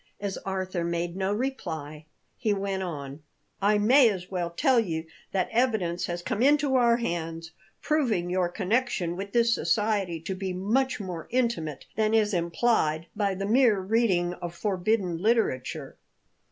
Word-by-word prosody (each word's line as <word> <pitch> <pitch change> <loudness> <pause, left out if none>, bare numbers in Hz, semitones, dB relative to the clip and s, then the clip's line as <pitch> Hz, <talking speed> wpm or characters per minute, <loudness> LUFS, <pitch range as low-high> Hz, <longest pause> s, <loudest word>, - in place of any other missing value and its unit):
As 200 -1 -3
Arthur 185 -2 -3
made 170 0 -2
no 190 +1 -1
reply, 160 - -4 0.3
he 220 -5 0
went 195 -1 -2
on: 145 -5 -6 0.4
"I 205 +2 +4
may 240 +4 +6
as 185 -3 -5
well 175 -2 -1
tell 255 - +3
you 165 -7 -2 0.3
that 185 -2 0
evidence 220 -8 +1
has 175 0 -4
come 225 0 -2
into 285 0 +4
our 235 -2 +4
hands 165 -6 -4 0.3
proving 240 - +1
your 180 0 0
connection 195 -2 0
with 200 +2 -6
this 235 0 +3
society 205 -8 0
to 190 - -4
be 190 -1 -4
much 225 +9 0
more 180 -5 -6
intimate 230 - -1
than 220 0 +2
is 215 -1 +2
implied 170 -2 +1
by 200 -2 0
the 195 +1 -3
mere 225 -1 +4
reading 190 -4 +1
of 175 -1 -7
forbidden 190 -2 0
literature. 215 - 0
195 Hz, 155 wpm, -27 LUFS, 175-225 Hz, 0.4 s, may